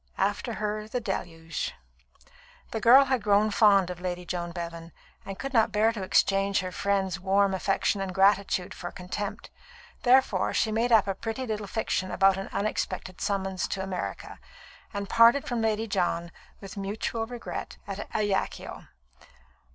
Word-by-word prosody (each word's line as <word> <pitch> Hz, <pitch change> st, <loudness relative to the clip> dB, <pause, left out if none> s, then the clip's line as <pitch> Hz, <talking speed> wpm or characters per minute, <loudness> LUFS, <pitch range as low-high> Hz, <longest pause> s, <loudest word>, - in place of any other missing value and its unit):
After 205 Hz, +4 st, -1 dB
her 215 Hz, 0 st, -3 dB
the 250 Hz, +3 st, -2 dB
Deluge. 170 Hz, -6 st, -4 dB, 1.0 s
The 225 Hz, -, -3 dB
girl 255 Hz, +5 st, +8 dB
had 260 Hz, -3 st, 0 dB
grown 210 Hz, +1 st, +3 dB
fond 200 Hz, -4 st, +4 dB
of 180 Hz, -1 st, -8 dB
Lady 180 Hz, -1 st, -4 dB
John 175 Hz, 0 st, -3 dB
Bevan, 170 Hz, -1 st, -7 dB, 0.4 s
and 195 Hz, -1 st, -6 dB
could 275 Hz, +4 st, -5 dB
not 225 Hz, -3 st, +4 dB
bear 215 Hz, +2 st, +3 dB
to 215 Hz, -, -5 dB
exchange 195 Hz, +1 st, +2 dB
her 185 Hz, 0 st, -5 dB
friend's 195 Hz, -1 st, -1 dB
warm 195 Hz, +1 st, +2 dB
affection 195 Hz, +1 st, 0 dB
and 190 Hz, -1 st, -3 dB
gratitude 195 Hz, -1 st, +2 dB
for 175 Hz, -, -6 dB
contempt. 190 Hz, +3 st, -6 dB, 0.5 s
Therefore 245 Hz, -7 st, +3 dB
she 220 Hz, -, +1 dB
made 230 Hz, +3 st, +1 dB
up 220 Hz, -3 st, +6 dB
a 195 Hz, -, 0 dB
pretty 225 Hz, +6 st, -4 dB
little 215 Hz, -3 st, -3 dB
fiction 185 Hz, -3 st, -1 dB
about 195 Hz, 0 st, +3 dB
an 195 Hz, -, -5 dB
unexpected 200 Hz, -3 st, -3 dB
summons 190 Hz, -2 st, -1 dB
to 190 Hz, -, -3 dB
America, 190 Hz, -2 st, -5 dB, 0.5 s
and 200 Hz, -1 st, -4 dB
parted 235 Hz, +6 st, +5 dB
from 240 Hz, -2 st, -2 dB
Lady 220 Hz, 0 st, 0 dB
John, 175 Hz, -4 st, -1 dB, 0.3 s
with 195 Hz, +1 st, -9 dB
mutual 215 Hz, +3 st, -3 dB
regret, 245 Hz, -1 st, -6 dB
at 200 Hz, 0 st, -6 dB
Ajaccio. 205 Hz, -2 st, -2 dB
200 Hz, 155 wpm, -27 LUFS, 190-220 Hz, 1.0 s, girl